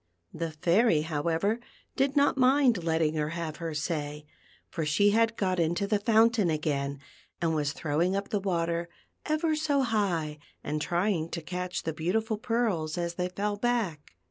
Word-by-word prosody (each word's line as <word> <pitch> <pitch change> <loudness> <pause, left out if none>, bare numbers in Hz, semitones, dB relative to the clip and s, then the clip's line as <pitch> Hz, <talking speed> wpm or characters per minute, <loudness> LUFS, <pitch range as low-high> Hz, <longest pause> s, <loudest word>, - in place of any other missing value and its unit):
The 165 0 -3
Fairy, 170 +3 +3
however, 165 +8 0 0.4
did 275 +1 +1
not 285 0 +4
mind 260 -6 +4
letting 160 -2 +1
her 150 -1 -1
have 165 -2 -4
her 165 -2 -4
say; 150 -1 -3 0.4
for 165 - -4
she 155 +8 +3
had 225 +1 +2
got 185 -2 0
into 170 +4 +1
the 205 0 +1
fountain 220 -2 +4
again, 140 -3 -1 0.4
and 165 -1 +1
was 145 -2 0
throwing 165 +5 0
up 200 0 -3
the 205 - 0
water 170 -3 -1 0.4
ever 310 +1 +1
so 295 -3 +1
high, 180 -10 0 0.2
and 150 +1 -2
trying 175 -1 0
to 170 - -4
catch 180 +2 -4
the 160 - -2
beautiful 210 +8 -1
pearls 220 -10 0
as 170 -1 -2
they 180 +1 -2
fell 205 +3 -2
back. 205 - -1
175 Hz, 165 wpm, -28 LUFS, 160-220 Hz, 0.4 s, not